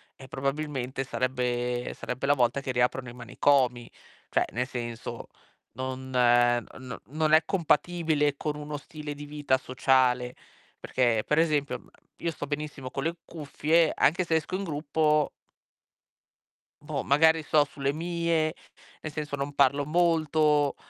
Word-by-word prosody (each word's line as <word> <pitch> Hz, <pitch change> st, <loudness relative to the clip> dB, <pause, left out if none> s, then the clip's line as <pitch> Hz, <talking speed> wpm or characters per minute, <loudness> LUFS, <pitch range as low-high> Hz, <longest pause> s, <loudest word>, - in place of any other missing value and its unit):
eh, 130 Hz, -, -13 dB
probabilmente 135 Hz, -1 st, -3 dB
sarebbe 125 Hz, -1 st, -2 dB
sarebbe 125 Hz, +2 st, -4 dB
la 145 Hz, -, +5 dB
volta 130 Hz, +2 st, +1 dB
che 130 Hz, -, -3 dB
riaprono 125 Hz, 0 st, 0 dB
i -, -, -10 dB
manicomi". 125 Hz, 0 st, +1 dB, 0.4 s
Cioè, -, -, +2 dB
nel 125 Hz, +2 st, -1 dB
senso, 120 Hz, -2 st, -6 dB, 0.5 s
non 130 Hz, +1 st, -5 dB
no 120 Hz, 0 st, +2 dB
non 155 Hz, +2 st, 0 dB
è 160 Hz, -, +7 dB
compatibile 160 Hz, -4 st, +1 dB
con 150 Hz, -1 st, -3 dB
uno 150 Hz, 0 st, -5 dB
stile 150 Hz, 0 st, -7 dB
di 145 Hz, +1 st, -8 dB
vita 145 Hz, -3 st, 0 dB
sociale, 130 Hz, -1 st, +2 dB, 0.5 s
perché 120 Hz, -4 st, +1 dB
per 150 Hz, -, +2 dB
esempio, 150 Hz, -4 st, +1 dB
mhmm, -, -, -21 dB, 0.3 s
io 170 Hz, -1 st, -1 dB
sto 145 Hz, -, -6 dB
benissimo 145 Hz, -3 st, -5 dB
con 135 Hz, -, -3 dB
le 170 Hz, +2 st, -2 dB
cuffie, 160 Hz, +1 st, +1 dB
anche 175 Hz, +5 st, +3 dB
se 160 Hz, -, +1 dB
esco 160 Hz, +3 st, -1 dB
in 200 Hz, -, -2 dB
gruppo 150 Hz, -1 st, +1 dB, 1.5 s
boh, -, -, -3 dB
magari 160 Hz, +2 st, +4 dB
sto 150 Hz, 0 st, +3 dB
sulle 140 Hz, 0 st, -2 dB
mie, 165 Hz, 0 st, 0 dB, 0.5 s
nel 155 Hz, -, -5 dB
senso 150 Hz, -1 st, -4 dB
non 140 Hz, +1 st, -4 dB
parlo 140 Hz, +1 st, +3 dB
molto. 155 Hz, -3 st, +2 dB
145 Hz, 140 wpm, -27 LUFS, 130-155 Hz, 1.5 s, è